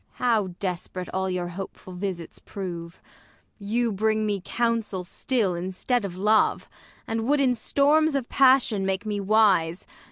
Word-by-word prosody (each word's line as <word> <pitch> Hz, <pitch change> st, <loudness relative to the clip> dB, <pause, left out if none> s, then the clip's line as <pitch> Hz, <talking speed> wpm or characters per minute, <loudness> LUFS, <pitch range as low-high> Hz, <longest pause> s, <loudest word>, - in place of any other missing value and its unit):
Ang. -, -, -5 dB
How 220 Hz, -5 st, +3 dB
desp'rate 180 Hz, -1 st, -4 dB
all 190 Hz, 0 st, -1 dB
your 180 Hz, -1 st, -2 dB
hopeful 185 Hz, 0 st, -8 dB
visits 180 Hz, -2 st, -5 dB
prove! 170 Hz, -4 st, -7 dB, 0.6 s
You 225 Hz, +3 st, 0 dB
bring 215 Hz, +2 st, +1 dB
me 205 Hz, -2 st, -1 dB
counsel 230 Hz, -6 st, -1 dB
still 210 Hz, +1 st, -1 dB
instead 190 Hz, +7 st, -1 dB
of 180 Hz, -2 st, -6 dB
love; 210 Hz, +3 st, +2 dB, 0.4 s
And 225 Hz, 0 st, -2 dB
would 290 Hz, +1 st, +3 dB
in 260 Hz, -3 st, +3 dB
storms 290 Hz, +5 st, +2 dB
of 265 Hz, -3 st, -1 dB
passion 255 Hz, -6 st, +4 dB
make 190 Hz, +2 st, -1 dB
me 210 Hz, -1 st, -2 dB
wise. 195 Hz, -5 st, +3 dB
205 Hz, 150 wpm, -25 LUFS, 185-235 Hz, 0.6 s, passion